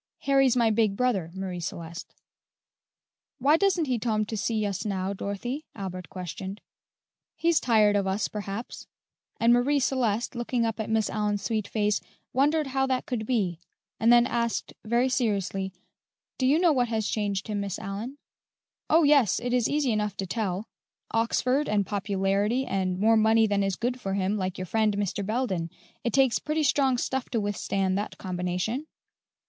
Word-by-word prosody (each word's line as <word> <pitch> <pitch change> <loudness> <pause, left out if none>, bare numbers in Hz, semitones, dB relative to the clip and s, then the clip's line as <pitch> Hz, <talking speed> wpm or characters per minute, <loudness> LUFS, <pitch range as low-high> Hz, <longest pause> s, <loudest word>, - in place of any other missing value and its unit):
Harry's 270 -3 +3
my 230 -2 +4
big 215 -2 +2
brother, 220 -10 +1
Marie 190 -2 -4
Celeste." 170 0 -7 1.2
"Why 285 +5 +4
doesn't 365 -2 +2
he 250 -4 0
tom 215 -2 0
to 220 - -5
see 215 0 0
us 200 -2 -2
now, 195 -2 -2
Dorothy?" 240 +10 -4
Albert 185 -3 -6
questioned. 190 +2 -6 0.8
"He's 335 -2 +2
tired 215 -4 +4
of 200 -1 +1
us, 195 +3 0
perhaps;" 210 +2 -6 0.5
and 230 +1 +5
Marie 270 +4 +3
Celeste, 245 -4 0
looking 240 -1 -1
up 225 -1 -2
at 220 - -3
Miss 220 -1 +2
Allyn's 210 -1 -1
sweet 215 -2 -1
face, 210 -2 0 0.3
wondered 295 +4 +2
how 270 0 0
that 260 -1 -1
could 240 -6 -3
be, 195 -10 0 0.4
and 230 +2 +4
then 240 0 +7
asked 235 -2 -1
very 235 +3 +2
seriously, 200 -6 -1 0.7
"Do 260 - +2
you 285 +4 +4
know 340 -2 +4
what 250 -3 +2
has 220 -2 -1
changed 200 -2 -1
him, 210 -2 -2
Miss 200 -2 -3
Aliyn?" 210 +8 -6 0.7
"Oh, 325 +2 +5
yes, 285 -9 +4
it 245 0 -2
is 245 -2 +2
easy 290 -4 +1
enough 210 -2 -1
to 195 - -2
tell: 195 0 -2 0.4
Oxford 250 +5 +1
and 205 -2 +2
popularity 200 +4 0
and 185 -3 -1
more 220 +3 +4
money 220 +1 +4
than 205 -1 +1
is 195 -1 0
good 245 +3 -2
for 195 0 -2
him, 195 +1 0
like 185 -3 -2
your 185 - -4
friend, 215 +1 +1
Mr. 205 0 -1
Belden. 195 -6 -1 0.3
It 235 - 0
takes 265 -2 +3
pretty 305 +1 -1
strong 270 -3 +3
stuff 265 +1 -2
to 235 - 0
withstand 195 -2 -1
that 210 - -5
combination." 180 - -2
220 Hz, 170 wpm, -27 LUFS, 195-250 Hz, 1.2 s, then